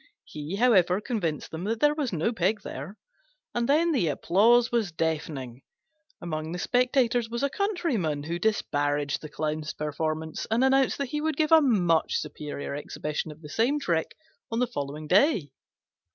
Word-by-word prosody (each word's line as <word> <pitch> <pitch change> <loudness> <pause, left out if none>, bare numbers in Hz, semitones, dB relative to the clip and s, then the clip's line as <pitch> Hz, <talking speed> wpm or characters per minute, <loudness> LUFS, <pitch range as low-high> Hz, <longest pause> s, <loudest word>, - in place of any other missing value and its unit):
He, 150 +4 -6
however, 195 -5 +4
convinced 190 - -3
them 165 +3 -5
that 225 +2 -1
there 295 +3 +4
was 295 -5 -2
no 175 +7 0
pig 200 +2 0
there, 155 +11 -7 0.6
and 240 +1 -1
then 330 +4 +4
the 250 - +1
applause 225 - +3
was 225 -6 0
deafening. 150 -6 -3 0.6
Among 160 -1 -4
the - - -3
spectators 245 +1 +1
was 235 +3 -3
a 280 - +1
Countryman, 280 - -1
who 170 +3 -3
disparaged 145 -9 0
the 155 - -8
Clown's 155 0 -3
performance 155 +1 -3
and 225 +4 +2
announced 265 0 +3
that 280 -3 -3
he 300 +2 -2
would 315 -2 -1
give 310 0 +1
a 320 -1 +8
much 180 - +2
superior 150 -2 -5
exhibition 150 +2 -4
of 150 +1 -14
the 150 - -9
same 245 - +1
trick 170 - -1 0.4
on 225 - -1
the 250 - +3
following 150 - -5
day. 190 - +3
185 Hz, 165 wpm, -27 LUFS, 155-245 Hz, 0.6 s, a